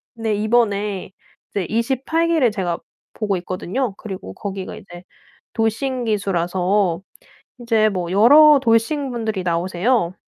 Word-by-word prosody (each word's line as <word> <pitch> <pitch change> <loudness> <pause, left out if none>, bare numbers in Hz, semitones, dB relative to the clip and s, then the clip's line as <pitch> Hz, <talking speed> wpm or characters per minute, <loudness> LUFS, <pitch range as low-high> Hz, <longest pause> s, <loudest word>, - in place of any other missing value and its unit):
네, 225 -1 -2
이번에 210 -3 0 0.4
이제 195 -3 -2
28 265 +8 0
기를 315 -9 +3
제가 180 -5 -2 0.4
보고 205 -3 -1
있거든요. 190 +6 -3
그리고 190 - -8
거기가 195 - -6
이제 175 -2 -12 0.5
돌싱 245 +3 -1
기수라서 190 -2 0 0.6
이제 225 -2 +2
뭐 180 -4 -3
여러 290 +10 +7
돌싱 260 +4 +1
분들이 220 -5 -3
나오세요. 180 +3 0
210 Hz, 255 characters per minute, -20 LUFS, 185-240 Hz, 0.6 s, 여러